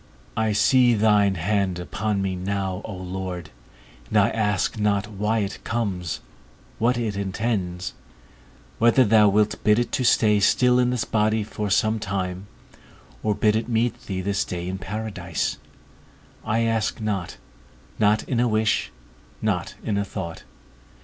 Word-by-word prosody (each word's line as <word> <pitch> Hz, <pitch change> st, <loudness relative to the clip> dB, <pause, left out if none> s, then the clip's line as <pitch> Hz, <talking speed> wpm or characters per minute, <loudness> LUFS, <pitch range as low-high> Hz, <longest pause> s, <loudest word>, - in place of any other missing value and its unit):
I 110 Hz, 0 st, +1 dB
see 120 Hz, +3 st, +4 dB
thine 105 Hz, -2 st, +3 dB
hand 95 Hz, +1 st, 0 dB
upon 100 Hz, +3 st, -2 dB
me 95 Hz, -1 st, -1 dB
now, 95 Hz, 0 st, -2 dB
O 110 Hz, -, -6 dB
Lord, 90 Hz, -2 st, -5 dB, 0.6 s
and -, -, +1 dB
I -, -, +5 dB
ask 105 Hz, -1 st, 0 dB
not 105 Hz, -1 st, +1 dB
why 105 Hz, +2 st, 0 dB
it 100 Hz, -1 st, -5 dB
comes, 90 Hz, -10 st, -2 dB, 0.6 s
what 120 Hz, +2 st, +2 dB
it 110 Hz, -4 st, -2 dB
intends; 95 Hz, -2 st, -2 dB, 0.9 s
whether 120 Hz, +3 st, +5 dB
thou 105 Hz, -1 st, +5 dB
wilt 105 Hz, +1 st, +1 dB
bid 105 Hz, 0 st, +4 dB
it 120 Hz, -, -1 dB
stay 105 Hz, -3 st, +4 dB
still 125 Hz, +5 st, +4 dB
in 125 Hz, 0 st, +3 dB
this 125 Hz, -2 st, -1 dB
body 110 Hz, 0 st, +1 dB
for 105 Hz, 0 st, -4 dB
some 110 Hz, +3 st, +2 dB
time, 95 Hz, -1 st, -3 dB, 0.7 s
or 105 Hz, -1 st, 0 dB
bid 105 Hz, +1 st, +2 dB
it 115 Hz, +2 st, -1 dB
meet 115 Hz, +1 st, -1 dB
thee 95 Hz, -2 st, -2 dB
this 100 Hz, +1 st, 0 dB
day 90 Hz, -1 st, -5 dB
in 95 Hz, +1 st, -4 dB
paradise, 95 Hz, -5 st, -3 dB, 0.8 s
I 110 Hz, +2 st, 0 dB
ask 115 Hz, -2 st, 0 dB
not, 100 Hz, -5 st, -3 dB, 0.6 s
not 105 Hz, 0 st, +3 dB
in 125 Hz, -, -1 dB
a 120 Hz, -, +3 dB
wish, 110 Hz, -1 st, +1 dB, 0.5 s
not -, -, -1 dB
in 100 Hz, -2 st, 0 dB
a -, -, +1 dB
thought. 85 Hz, -4 st, -6 dB
105 Hz, 150 wpm, -24 LUFS, 95-110 Hz, 0.9 s, I